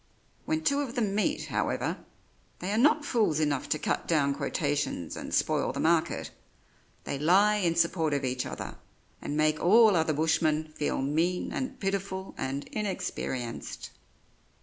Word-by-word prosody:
When 315 0 -1
two 280 0 +2
of 265 -3 -5
them 215 -5 0
meet, 285 +9 0
however, - - -1 0.6
they 185 - -4
are 210 - +1
not 300 +3 +4
fools 215 - +1
enough 145 -3 0
to - - +1
cut - - -2
down 145 -4 +2
quotations 145 - -2
and - - -7
spoil - - +1
the - - -5
market; - - +1 0.7
they 140 - -4
lie 195 +7 +4
in 170 -5 +1
support 170 -2 +2
of 140 -1 -1
each 125 0 -1
other, - - -6 0.4
and 145 - -3
make 155 0 +2
all 215 +2 +6
other 160 -1 +2
bushmen 155 0 +1
feel 145 -2 -1
mean 165 +6 0
and 265 0 -4
pitiful 195 -1 -3
and 135 +2 -3
inexperienced. 185 - -4
170 Hz, 150 wpm, -29 LUFS, 150-210 Hz, 0.7 s, all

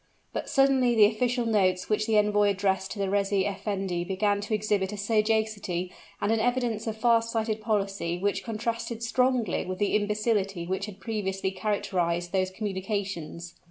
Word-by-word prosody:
But - - -4
suddenly 265 -3 +4
the 215 -2 +8
official 240 +3 +1
notes 185 -5 +2
which 215 0 0
the 220 -1 +3
envoy 210 0 +4
addressed 190 -1 0
to - - -10
the 200 -1 0
reis 200 0 0
effendi 195 -2 -1
began 200 +2 0
to 210 +1 -1
exhibit 205 -2 0
a 210 - -5
sagacity 210 -4 0 0.3
and 205 - 0
an 225 - +2
evidence 240 -2 0
of 220 -1 -3
far 230 0 +4
sighted 225 -1 -2
policy 195 -5 -1
which 200 +3 -1
contrasted 230 +1 -3
strongly 250 -3 +1
with 185 0 -4
the 205 +1 +1
imbecility 205 -3 0
which 190 +3 -2
had 205 -1 -10
previously 195 -3 -2
characterized 180 -3 -1
those 185 -1 +1
communications. 190 -4 -4
205 Hz, 160 wpm, -27 LUFS, 190-220 Hz, 0.3 s, the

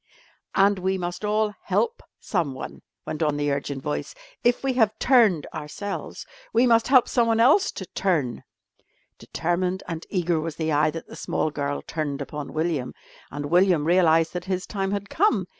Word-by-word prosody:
"And 200 0 +4
we 190 +1 0
must 175 +2 -4
all 210 0 +1
help 470 0 0 0.2
someone," 155 -9 -3 0.2
went 155 - -5
on 150 -2 +1
the 145 0 0
urgent 140 -1 -3
voice. 150 - -3 0.3
"If 240 +2 +2
we 270 -1 +1
have 220 -4 +2
turned 220 - +4
ourselves, 155 +7 -6 0.3
we 235 +3 +4
must 230 -2 +4
help 255 -2 +5
someone 230 -2 +2
else 290 - +5
to 190 - -6
turn...." 160 -11 -1 0.8
Determined 180 +3 -2
and 165 -1 -5
eager 175 -4 0
was 160 -1 -4
the 160 -1 -1
eye 150 +1 +3
that 165 +1 -6
the - - -12
small 155 - -1
girl 145 -1 -3
turned 150 -3 -3
upon 150 -2 -6
William, 155 -5 -2 0.3
and 145 0 -5
William 175 -4 +4
realised 165 -2 +4
that 180 -1 -4
his 185 0 -2
time 195 -2 -2
had 200 0 -3
come. 420 - +2
180 Hz, 170 wpm, -25 LUFS, 155-210 Hz, 0.8 s, help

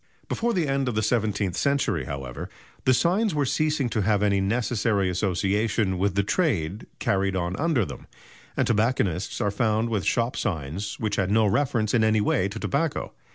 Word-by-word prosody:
Before 235 +1 0
the 175 -8 0
end 135 -1 0
of 120 - -3
the 110 - +1
seventeenth 105 -5 0
century, 140 - 0
however, 65 -3 -6 0.4
the 130 - +5
signs 185 - +2
were 145 -1 +1
ceasing 150 0 +1
to 110 - 0
have 105 0 +2
any 100 -1 +2
necessary 105 -2 +1
association 100 +1 0
with 100 0 +1
the 100 - +2
trade 105 - -1
carried 95 -1 0
on 90 0 -1
under 155 - +1
them, - - -9 0.5
and - - +2
tobacconists 105 -6 0
are 100 - +1
found 110 +1 +1
with 105 -5 -1
shop 120 +1 0
signs 85 - -3
which 105 -2 -1
had 95 -2 +1
no 110 +1 +4
reference 110 -1 +1
in 115 -3 +3
any 110 0 +3
way 100 -2 +1
to 100 - -7
tobacco. 145 +2 -1
105 Hz, 180 wpm, -25 LUFS, 95-125 Hz, 0.5 s, the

